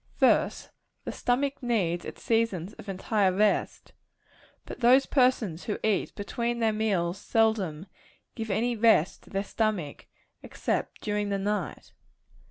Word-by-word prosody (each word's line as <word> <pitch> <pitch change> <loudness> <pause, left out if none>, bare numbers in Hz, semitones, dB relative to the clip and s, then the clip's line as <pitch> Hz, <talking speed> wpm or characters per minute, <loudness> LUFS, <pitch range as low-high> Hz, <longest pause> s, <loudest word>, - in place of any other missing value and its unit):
First - - +2 0.3
the - - -4
stomach 275 +3 -1
needs 190 -9 0
its - - -9
seasons 220 -5 0
of 200 - -11
entire 195 +1 +1
rest; 205 +2 0 0.7
but - - -8
those 255 +3 +5
persons 250 - +1
who 210 - -2
eat 215 -3 0
between 235 +4 -2
their 225 -2 +1
meals 195 -4 0
seldom 205 -8 +1 0.5
give 225 -2 -5
any 235 +5 0
rest 220 -6 +3
to - - -19
their 195 0 -2
stomachs, 205 -8 -2 0.4
except - - -3
during 210 -1 -1
the 200 - 0
night. 195 -6 -3
210 Hz, 135 wpm, -28 LUFS, 190-230 Hz, 0.7 s, those